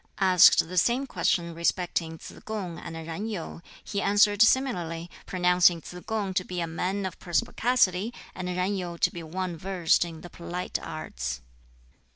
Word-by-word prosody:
Asked 185 Hz, -4 st, +6 dB
the 180 Hz, +1 st, +1 dB
same 245 Hz, +8 st, +2 dB
question 170 Hz, -9 st, 0 dB
respecting 170 Hz, -1 st, -1 dB
Tsz -, -, -11 dB
kung 195 Hz, -6 st, -5 dB
and 165 Hz, -, -8 dB
Yen 165 Hz, +6 st, -5 dB
Yu 180 Hz, -5 st, -5 dB, 0.2 s
he 200 Hz, -1 st, -3 dB
answered 205 Hz, +1 st, +4 dB
similarly, 175 Hz, -10 st, +2 dB, 0.2 s
pronouncing 180 Hz, -1 st, +4 dB
Tsz 165 Hz, -, -11 dB
kung 210 Hz, -4 st, -1 dB
to 185 Hz, -, +1 dB
be 180 Hz, -1 st, -5 dB
a 170 Hz, -, 0 dB
man 185 Hz, +4 st, -2 dB
of 185 Hz, -, -5 dB
perspicacity, 200 Hz, +3 st, +1 dB, 0.2 s
and 180 Hz, -1 st, -5 dB
Yen 180 Hz, +3 st, 0 dB
Yu 175 Hz, -3 st, -4 dB
to -, -, +2 dB
be 170 Hz, -, -7 dB
one 175 Hz, +2 st, -4 dB
versed 180 Hz, -1 st, +2 dB
in 165 Hz, -2 st, -8 dB
the 175 Hz, -, -10 dB
polite 175 Hz, +1 st, -4 dB
arts. 65 Hz, -, -5 dB
180 Hz, 165 wpm, -27 LUFS, 170-200 Hz, 0.2 s, Asked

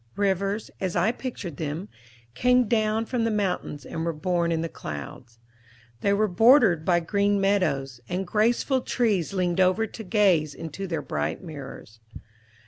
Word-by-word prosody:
Rivers, 200 Hz, +1 st, -1 dB
as 185 Hz, -2 st, -2 dB
I 180 Hz, +6 st, +3 dB
pictured 220 Hz, -, -6 dB
them, 155 Hz, +5 st, -4 dB, 0.5 s
came 250 Hz, -, +3 dB
down 220 Hz, 0 st, +1 dB
from 240 Hz, 0 st, -1 dB
the 230 Hz, -, +1 dB
mountains, 190 Hz, -9 st, -2 dB
and 165 Hz, -, -4 dB
were 170 Hz, -, 0 dB
born 170 Hz, +2 st, -1 dB
in 165 Hz, -1 st, 0 dB
the 165 Hz, -, -2 dB
clouds. 80 Hz, -, -8 dB, 0.6 s
They 200 Hz, -, +1 dB
were 210 Hz, +2 st, +2 dB
bordered 215 Hz, -, +5 dB
by 175 Hz, 0 st, +2 dB
green 200 Hz, +3 st, +1 dB
meadows, 140 Hz, -11 st, 0 dB
and 185 Hz, +2 st, -2 dB
graceful 235 Hz, +7 st, +1 dB
trees 215 Hz, -10 st, 0 dB
leaned 180 Hz, -2 st, 0 dB
over 185 Hz, +4 st, +3 dB
to 220 Hz, +1 st, -9 dB
gaze 185 Hz, -8 st, +2 dB
into 165 Hz, +4 st, -6 dB
their 160 Hz, -4 st, -3 dB
bright 75 Hz, -, -3 dB
mirrors. 135 Hz, -8 st, -10 dB
185 Hz, 155 wpm, -25 LUFS, 160-215 Hz, 0.6 s, bordered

